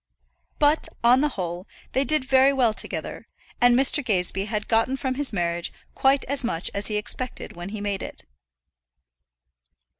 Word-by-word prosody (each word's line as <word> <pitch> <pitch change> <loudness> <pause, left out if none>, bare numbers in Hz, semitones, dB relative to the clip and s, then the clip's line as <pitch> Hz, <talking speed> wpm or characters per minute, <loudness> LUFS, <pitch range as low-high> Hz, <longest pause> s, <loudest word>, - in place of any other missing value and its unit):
But, 295 +1 +2 0.2
on 245 +3 +5
the 300 - +2
whole, 180 -6 -5 0.2
they 265 - +1
did 305 -2 +1
very 265 +1 +5
well 250 -5 +2
together, - - -4 0.3
and 245 0 +6
Mr. 275 +2 +3
Gazebee 195 -3 0
had 210 -1 -3
gotten 230 +4 +1
from 260 -1 -2
his 280 +1 0
marriage 170 -3 -2 0.2
quite 270 +1 +2
as 280 0 0
much 175 -8 -1
as 200 +1 +2
he 215 - -2
expected 250 +4 -3
when 175 +2 -7
he 210 0 -6
made 200 -2 -2
it. - - -8
240 Hz, 160 wpm, -24 LUFS, 200-270 Hz, 0.3 s, and